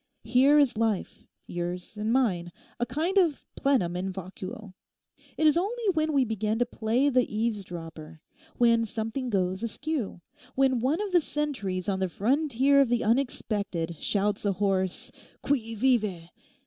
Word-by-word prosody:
Here 255 +6 +5
is 275 -6 +3
life—yours 180 -4 -4
and 215 +1 -2
mine—a 220 -2 -1
kind 330 - +1
of 330 -6 +1
plenum 235 -12 +1
in 190 +2 -2
vacuo_. 190 +2 -8 0.6
It 315 - +1
is 305 - +6
only 445 +7 -1
when 315 -1 +1
we 275 -3 +3
begin 220 -1 -1
to 245 - +2
play 235 +3 0
the 255 -2 +2
eavesdropper; 175 -8 -4 0.4
when 230 -1 +4
something 225 +4 -3
goes 190 -3 0
askew; 235 - -3 0.3
when 265 -2 +3
one 275 - +1
of 415 -2 -3
the 350 -2 +5
sentries 230 - -3
on 195 -2 0
the 190 -1 0
frontier 275 - +3
of 270 - +2
the 240 -1 +1
unexpected 210 -8 -1
shouts 205 0 0
a 200 -2 +1
hoarse 190 -1 -1 0.3
"Qui 230 -5 -1
vive?" 210 -8 +1
225 Hz, 145 wpm, -27 LUFS, 190-270 Hz, 0.6 s, is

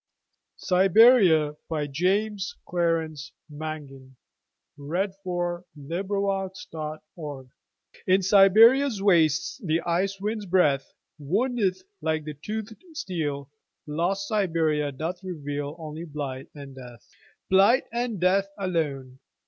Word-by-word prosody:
ria - - -55
Siberia 185 -5 +5
By 155 -2 -1
James 195 +7 -1
Clarence 165 -3 -1 0.2
Mangan 145 -4 -8 0.6
(1803–1849) 175 -3 -4 0.6
IN 190 +1 +4
Siberia's 215 +6 +6
wastesThe 165 - +2
ice 190 +3 0
wind's 210 0 -3
breathWoundeth 185 - 0 0.2
like 155 -1 -1
the 150 0 -6
toothéd 215 - -6
steel; 150 - -4 0.3
Lost 175 +6 -1
Siberia 160 -8 0
doth 165 +6 -5
revealOnly 155 -1 -6
blight 135 -3 -5
and 140 -2 -10
death. 125 -4 -12 0.4
Blight 200 +8 +5
and 235 -4 -2
death 195 +2 +2
alone. 145 -9 -3
175 Hz, 85 wpm, -26 LUFS, 150-195 Hz, 0.6 s, Siberia's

